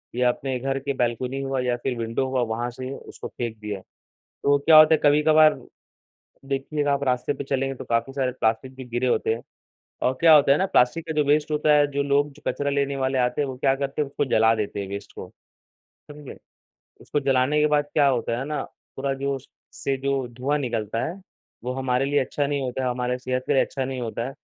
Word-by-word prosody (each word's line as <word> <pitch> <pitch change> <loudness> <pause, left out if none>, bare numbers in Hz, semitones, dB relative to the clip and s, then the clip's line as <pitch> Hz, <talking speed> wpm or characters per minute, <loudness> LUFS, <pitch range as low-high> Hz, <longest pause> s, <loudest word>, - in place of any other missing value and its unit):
या 125 0 +3
अपने 130 +1 -2
घर 135 +2 -2
की 140 +1 -3
बालकनी 125 +1 -1
हुआ 135 -1 -2
या 125 -1 0
फिर 125 -2 -2
विंडो 115 +3 -1
हुआ 130 -1 0
वहाँ 120 +1 -2
से 130 +2 -7
उसको - - -9
फेंक 115 -2 -5
दिया। 105 -2 -5 0.6
तो 140 0 +4
क्या 155 +2 +6
होता 155 +1 +8
है 155 - +3
कभी-कभार 155 +1 +5 1.0
देखिएगा 145 +1 -1
आप 140 0 -1
रास्ते 125 +1 0
पे - - -6
चलेंगे 135 0 -1
तो - - -9
काफ़ी 115 +3 -1
सारे 135 -2 -1
प्लास्टिक 115 +4 -1
भी 130 0 -9
गिरे 120 +2 -1
होते 115 -2 +1
हैं। 115 - -7 0.6
और 125 - +3
क्या 165 -1 +7
होता 140 -2 +6
है 140 - +3
ना 190 - +1
प्लास्टिक 165 +1 +2
का 160 - -3
जो 150 -1 +2
वेस्ट 150 +2 +2
होता 150 0 +2
है, 145 0 +5
जो 140 0 -2
लोग 140 +1 +1
जो - - -19
कचरा 145 0 -1
लेने 140 0 0
वाले 130 0 0
आते 125 +2 +1
हैं 145 - 0
वो 130 - -6
क्या 135 +1 +2
करते 140 +2 -2
हैं 145 - -4
उसको 145 +1 -1
जला 110 -2 +4
देते 105 -2 -3
हैं 100 - -5
वेस्ट 100 +1 -7
को। - - -9 0.8
समझे? 145 -2 -10 0.6
उसको 145 - -2
जलाने 135 +2 +2
के 150 - +4
बाद 150 -1 +2
क्या 145 -2 +4
होता 120 -2 0
है 130 - -3
ना, 150 +1 -3
पूरा 135 +1 -6
जो 140 +1 -2
उस 135 +1 -13 0.2
से 135 - -2
जो 135 -1 -1
धुआँ 130 +5 -1
निकलता 115 -4 -2
है, 170 - -5 0.5
वो 125 - -2
हमारे 130 0 0
लिए 145 +1 +2
अच्छा 140 +2 -1
नहीं 140 0 -1
होता 130 0 -3
है, 125 - +1
हमारे 125 0 -2
सेहत 130 0 -2
के - - +1
लिए 135 - +4
अच्छा 135 - -3
नहीं 130 0 -4
होता 115 0 -3
है। 135 - -9
135 Hz, 230 wpm, -24 LUFS, 125-145 Hz, 1.0 s, होता